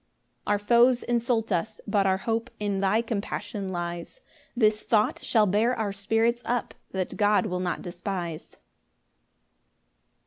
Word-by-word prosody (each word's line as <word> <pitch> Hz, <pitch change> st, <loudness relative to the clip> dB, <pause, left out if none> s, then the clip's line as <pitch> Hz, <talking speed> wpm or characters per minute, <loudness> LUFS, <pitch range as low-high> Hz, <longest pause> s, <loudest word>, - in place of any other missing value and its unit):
5 -, -, -24 dB
Our 205 Hz, -, +3 dB
foes 240 Hz, +4 st, +4 dB
insult 235 Hz, -2 st, 0 dB
us, 210 Hz, +5 st, -1 dB
but 200 Hz, -1 st, +2 dB
our 190 Hz, 0 st, +3 dB
hope 225 Hz, +3 st, -2 dB
In 205 Hz, -2 st, -1 dB
thy 200 Hz, +4 st, +2 dB
compassion 205 Hz, -3 st, -4 dB
lies; 175 Hz, -, -5 dB, 0.4 s
This 215 Hz, -2 st, +3 dB
thought 215 Hz, -2 st, +1 dB
shall 220 Hz, -3 st, +3 dB
bear 215 Hz, +6 st, +2 dB
our 210 Hz, -3 st, -1 dB
spirits 225 Hz, +4 st, +1 dB
up, 240 Hz, -1 st, -2 dB, 0.2 s
That 190 Hz, -1 st, -3 dB
God 210 Hz, +1 st, +3 dB
will 180 Hz, -3 st, -2 dB
not 180 Hz, -1 st, -2 dB
despise. 175 Hz, -2 st, -5 dB
210 Hz, 140 wpm, -27 LUFS, 190-230 Hz, 0.4 s, foes